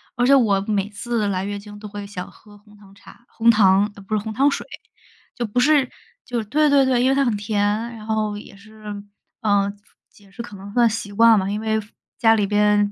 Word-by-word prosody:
而 245 -1 +1
且 275 - +6
我 205 -7 +3
每 205 -1 -1
次 215 +1 -2
来 190 -1 -1
月 205 0 -4
经 205 0 -12
都 210 - -8
会 205 0 -7
想 180 -3 -7
喝 205 -1 -18
红 210 0 -21
糖 195 -1 -18
茶 235 +3 -17
红 230 +1 +3
糖 205 -1 +3
呃， 200 - -12
不 215 - -3
是， 210 - -2
红 220 - -5
糖 275 +6 +3
水。 - - -4 0.7
就 245 - -3
不 230 +4 -1
是 285 -1 +3 0.4
就 245 - -4
是 220 - -5
对 300 +7 +2
对 280 -2 +4
对， 250 -1 +2
因 260 - +3
为 270 - +2
它 275 0 +2
很 235 -4 0
甜， 205 0 -2 0.4
然 215 - -11
后 215 -1 -1
也 205 - -12
是 215 +1 -17 0.6
嗯， 205 -1 +1 0.3
解 200 -1 -22
释 215 - -8
可 220 -4 -10
能 195 +1 -10
算 240 -1 +4
习 210 -2 -5
惯 225 +2 +5
吧， 190 +1 -2
因 210 +1 -2
为 220 0 0
父 210 - -19 0.3
家 225 -1 +5
里 205 -2 0
边 205 0 +2
210 Hz, 255 characters per minute, -21 LUFS, 205-230 Hz, 0.7 s, 且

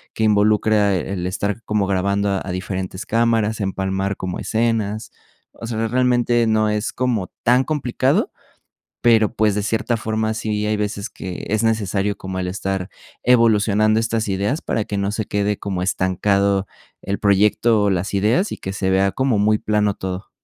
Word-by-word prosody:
que 110 - -1
involucra 105 -1 +3
el 90 0 -3
estar 100 +4 -2
como 105 -2 0
grabando 100 +1 0
a 90 - -5
diferentes 95 0 -4
cámaras, 115 -1 +1
empalmar 95 0 -2
como 90 -1 -4
escenas. 110 -2 -1 0.4
O 115 - -9
sea, 115 -1 -1
realmente 120 -1 +2
no 110 -1 +2
es 105 +1 -2
como 120 -7 -1
tan 125 +2 +4
complicado. 135 -5 0 0.7
Pero, 110 -3 +4
pues, 110 -2 +2
de 105 - -1
cierta 115 +3 -1
forma 110 0 -1
sí 105 -1 -2
hay 105 0 0
veces 105 -1 -3
que 90 -2 -7
es 110 +1 +1
necesario 105 -2 0
como 95 0 -5
el 90 - -2
estar 95 0 -3 0.3
evolucionando 110 -3 +3
estas 115 -1 -1
ideas 100 - -1
para 110 - -1
que 100 - -4
no 100 0 -1
se 110 0 -3
quede 105 0 -1
como 95 -3 -3
estancado 100 +1 +1 0.4
el 100 - -3
proyecto 105 +2 +3
o 100 - +2
las 95 +2 -1
ideas 115 - +2
y - - -4
que 95 - -6
se 95 -1 -1
vea 95 +1 +2
como 130 -3 +1
muy 105 +1 +2
plano 105 -1 +1
todo. 95 0 -6
105 Hz, 165 wpm, -20 LUFS, 100-110 Hz, 0.7 s, tan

